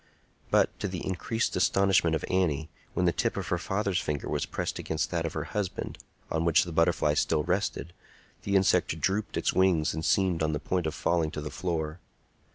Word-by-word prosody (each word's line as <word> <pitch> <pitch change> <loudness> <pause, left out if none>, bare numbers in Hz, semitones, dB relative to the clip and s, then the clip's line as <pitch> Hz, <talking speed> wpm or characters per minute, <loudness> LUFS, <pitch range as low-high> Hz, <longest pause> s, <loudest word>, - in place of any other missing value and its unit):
But, - - +2
to - - -1
the 90 -2 -5
increased 110 +5 -1
astonishment 95 -4 +3
of 80 - -2
Annie, 80 -4 0 0.2
when 90 - +2
the 85 - +4
tip - - -1
of - - -3
her - - 0
father's 100 -2 0
finger 75 -1 -3
was - - -1
pressed - - -3
against 80 0 -2
that 85 -2 0
of - - -5
her 80 - -2
husband, 95 +2 -4 0.3
on 80 0 0
which 85 +3 +4
the 85 - -6
butterfly 80 -2 +2
still 75 0 +1
rested, 90 -2 -1 0.5
the 100 - -1
insect 90 -4 +3
drooped 100 +3 -1
its - - +1
wings 90 -5 +3
and 80 +1 -4
seemed 90 -3 +2
on 80 0 +1
the 75 - -1
point 90 -3 -1
of 80 - -3
falling 85 -2 +1
to 75 - -5
the 75 - -5
floor. 85 -2 -3
85 Hz, 200 wpm, -28 LUFS, 80-95 Hz, 0.5 s, the